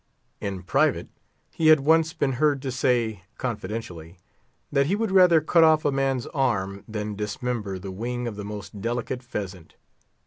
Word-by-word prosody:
In 95 Hz, -2 st, -4 dB
private, -, -, +1 dB, 0.4 s
he 160 Hz, -, 0 dB
had 155 Hz, -2 st, +7 dB
once 160 Hz, +2 st, +3 dB
been 140 Hz, -4 st, 0 dB
heard 145 Hz, +2 st, +2 dB
to 135 Hz, -, -2 dB
say, 120 Hz, -5 st, 0 dB, 0.2 s
confidentially, 105 Hz, -8 st, -5 dB, 0.5 s
that 140 Hz, -1 st, +2 dB
he 190 Hz, -, +1 dB
would 220 Hz, -1 st, -1 dB
rather 180 Hz, -4 st, +6 dB
cut 165 Hz, +2 st, +4 dB
off 155 Hz, -1 st, +4 dB
a 145 Hz, -, +3 dB
man's 135 Hz, -2 st, 0 dB
arm 100 Hz, -8 st, -1 dB
than 105 Hz, -1 st, -4 dB
dismember 105 Hz, 0 st, -3 dB
the 95 Hz, +1 st, -7 dB
wing 120 Hz, +5 st, -4 dB
of 115 Hz, -, -5 dB
the 105 Hz, -, -6 dB
most 105 Hz, 0 st, -7 dB
delicate 120 Hz, +2 st, -2 dB
pheasant. 95 Hz, -8 st, -7 dB
120 Hz, 165 wpm, -25 LUFS, 105-140 Hz, 0.5 s, had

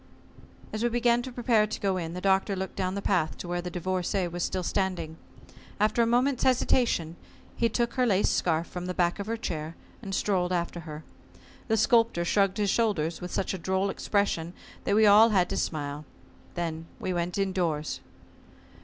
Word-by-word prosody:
As 215 Hz, -, -3 dB
we 240 Hz, -, +2 dB
began 240 Hz, 0 st, +2 dB
to 260 Hz, +1 st, -7 dB
prepare 230 Hz, -3 st, +2 dB
to 215 Hz, -, -5 dB
go 195 Hz, -2 st, 0 dB
in, 165 Hz, -1 st, -4 dB
the 180 Hz, -, -5 dB
Doctor 195 Hz, +1 st, +2 dB
looked 190 Hz, 0 st, -4 dB
down 185 Hz, -1 st, -2 dB
the 200 Hz, -, -4 dB
path 175 Hz, -6 st, +1 dB
to -, -, -7 dB
where 175 Hz, 0 st, -2 dB
the 180 Hz, -, -5 dB
Divorcée 180 Hz, 0 st, -1 dB
was 175 Hz, +1 st, -4 dB
still 185 Hz, -1 st, -2 dB
standing. 175 Hz, -4 st, -2 dB, 0.6 s
After 215 Hz, +3 st, +3 dB
a 230 Hz, -, +3 dB
moment's 250 Hz, +2 st, +2 dB
hesitation 235 Hz, -10 st, +2 dB, 0.4 s
he 230 Hz, -, +1 dB
took 235 Hz, +1 st, 0 dB
her 255 Hz, -1 st, +2 dB
lace 200 Hz, -2 st, +3 dB
scarf 165 Hz, -1 st, +1 dB
from 180 Hz, 0 st, -6 dB
the 180 Hz, -, -3 dB
back 175 Hz, +2 st, +1 dB
of 200 Hz, -, -4 dB
her 230 Hz, +1 st, -2 dB
chair, 160 Hz, -6 st, -4 dB, 0.3 s
and 195 Hz, -4 st, -4 dB
strolled 180 Hz, -3 st, 0 dB
after 175 Hz, -1 st, -1 dB
her. 150 Hz, +1 st, -7 dB, 0.6 s
The 225 Hz, -1 st, +2 dB
Sculptor 225 Hz, -5 st, +3 dB
shrugged 195 Hz, +2 st, +2 dB
his 205 Hz, -2 st, +1 dB
shoulders 180 Hz, -9 st, 0 dB
with 180 Hz, -, -5 dB
such 195 Hz, -, -1 dB
a 190 Hz, -, -4 dB
droll 190 Hz, +3 st, 0 dB
expression 180 Hz, -5 st, -1 dB, 0.3 s
that 200 Hz, -, +2 dB
we 220 Hz, 0 st, +5 dB
all 210 Hz, +2 st, +8 dB
had 185 Hz, -5 st, +3 dB
to -, -, -1 dB
smile. 145 Hz, -1 st, -3 dB, 0.5 s
Then 165 Hz, -2 st, -3 dB
we 185 Hz, -, -2 dB
went 175 Hz, +1 st, -2 dB
indoors. 180 Hz, -6 st, -1 dB
190 Hz, 190 wpm, -28 LUFS, 175-215 Hz, 0.6 s, all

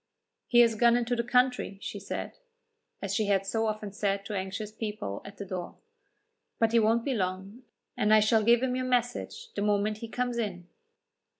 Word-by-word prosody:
"He 240 Hz, -1 st, +6 dB
has 230 Hz, -1 st, +5 dB
gone 235 Hz, +2 st, +4 dB
into 245 Hz, 0 st, 0 dB
the 235 Hz, -, 0 dB
country," 250 Hz, -4 st, +1 dB
she 205 Hz, -, -6 dB
said, 200 Hz, -, -6 dB, 0.6 s
as -, -, -2 dB
she 215 Hz, -2 st, +1 dB
had 195 Hz, -1 st, +2 dB
so 225 Hz, +3 st, 0 dB
often 215 Hz, -1 st, -3 dB
said 200 Hz, 0 st, -1 dB
to 210 Hz, -, -5 dB
anxious 200 Hz, +2 st, -4 dB
people 210 Hz, -, -5 dB
at 200 Hz, 0 st, -11 dB
the 200 Hz, -, -6 dB
door; 185 Hz, -2 st, -5 dB, 0.8 s
"but 225 Hz, -1 st, +2 dB
he 235 Hz, -, +5 dB
won't 225 Hz, +1 st, +2 dB
be 275 Hz, -, 0 dB
long, 195 Hz, +2 st, -3 dB, 0.3 s
and 210 Hz, 0 st, +1 dB
I 215 Hz, -, +8 dB
shall 215 Hz, +1 st, +4 dB
give 235 Hz, +3 st, +4 dB
him 255 Hz, -1 st, 0 dB
your 255 Hz, 0 st, -2 dB
message 245 Hz, -1 st, -2 dB
the 200 Hz, -, -3 dB
moment 210 Hz, +1 st, +1 dB
he 230 Hz, -, -6 dB
comes 245 Hz, +1 st, -2 dB
in." 180 Hz, -6 st, -4 dB
215 Hz, 195 wpm, -29 LUFS, 200-235 Hz, 0.8 s, I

